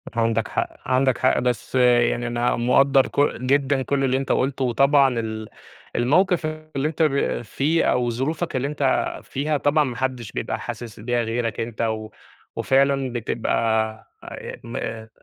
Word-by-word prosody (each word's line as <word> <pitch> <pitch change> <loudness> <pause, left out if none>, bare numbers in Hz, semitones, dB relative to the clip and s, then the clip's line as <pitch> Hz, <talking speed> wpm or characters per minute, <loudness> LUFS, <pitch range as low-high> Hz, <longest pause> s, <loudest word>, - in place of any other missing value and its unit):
عندك 115 -1 +1
حق، - - -2 0.2
عندك 130 0 +2
حق، 130 - +2
بس 125 -1 -2
يعني 120 -1 +3
أنا 120 +1 0
مقدّر 130 +3 +4
ك - - -4 0.2
جدًا 135 +1 +2
كل 140 +1 0
اللي 130 -1 +2
أنت 135 - -2
قُلته 130 0 0
وطبعًا 135 0 +3
ال 110 -1 -5 0.5
الموقِف 170 +8 +2
اللي 155 -2 -3
أنت 160 +1 -4
ب 140 -5 +1
فيه 145 +8 0
أو 125 -1 +1
ظروفك 140 +7 -2
اللي 130 +2 0
أنت 140 -3 0
فيها، 150 +2 -1
طبعًا 145 +2 +2
ما 130 -4 -4
حدّش 125 -3 -3
بيبقى - - -3
حاسس 115 -2 -7
بيها 120 +2 0
غيرك 115 -1 -2
أنت 115 0 -4
و 110 -1 -2 0.5
وفعلًا 135 -1 +2
بتبقى 120 -1 -2 0.7
آآ - - -8
م 115 0 -8
آآ 110 -1 -5
130 Hz, 160 wpm, -23 LUFS, 120-140 Hz, 0.7 s, مقدّر